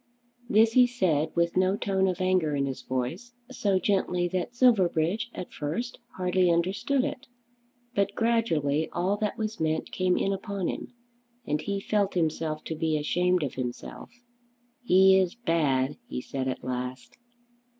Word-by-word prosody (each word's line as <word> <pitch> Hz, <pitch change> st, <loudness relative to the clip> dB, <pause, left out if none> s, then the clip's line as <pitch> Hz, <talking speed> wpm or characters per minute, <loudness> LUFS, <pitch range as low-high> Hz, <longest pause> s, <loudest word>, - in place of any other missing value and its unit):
This 220 Hz, +2 st, +5 dB
he 250 Hz, 0 st, +6 dB
said 165 Hz, -11 st, +1 dB
with 170 Hz, 0 st, +1 dB
no 185 Hz, +2 st, +2 dB
tone 190 Hz, -2 st, +1 dB
of 185 Hz, 0 st, -1 dB
anger 185 Hz, -5 st, +2 dB
in 140 Hz, -1 st, 0 dB
his 135 Hz, -1 st, -4 dB
voice, 160 Hz, -, -4 dB, 0.2 s
so 200 Hz, -6 st, +1 dB
gently 185 Hz, -2 st, +1 dB
that 185 Hz, +6 st, -3 dB
Silverbridge 210 Hz, -4 st, +2 dB
at 180 Hz, -, -7 dB
first 165 Hz, +12 st, -4 dB, 0.2 s
hardly 180 Hz, 0 st, +2 dB
understood 195 Hz, +11 st, +1 dB
it. 270 Hz, -, -5 dB, 0.7 s
But 200 Hz, -1 st, 0 dB
gradually 160 Hz, -11 st, +1 dB
all 180 Hz, +4 st, +1 dB
that 210 Hz, 0 st, -2 dB
was 220 Hz, 0 st, -3 dB
meant 160 Hz, 0 st, -1 dB
came 185 Hz, -1 st, +1 dB
in 195 Hz, -, +1 dB
upon 195 Hz, -1 st, -3 dB
him, -, -, -5 dB, 0.6 s
and 150 Hz, +1 st, -1 dB
he 200 Hz, +4 st, -2 dB
felt 200 Hz, -1 st, 0 dB
himself 160 Hz, -2 st, -1 dB
to 160 Hz, -, -4 dB
be 155 Hz, 0 st, 0 dB
ashamed 180 Hz, +3 st, +1 dB
of 140 Hz, -, -3 dB
himself. 125 Hz, -2 st, -6 dB, 0.7 s
"He 190 Hz, -3 st, +6 dB
is 185 Hz, +1 st, 0 dB
bad," 145 Hz, -, 0 dB
he -, -, -4 dB
said 130 Hz, +1 st, -4 dB
at 130 Hz, -, -3 dB
last. 125 Hz, -, -5 dB
180 Hz, 155 wpm, -27 LUFS, 155-200 Hz, 0.7 s, he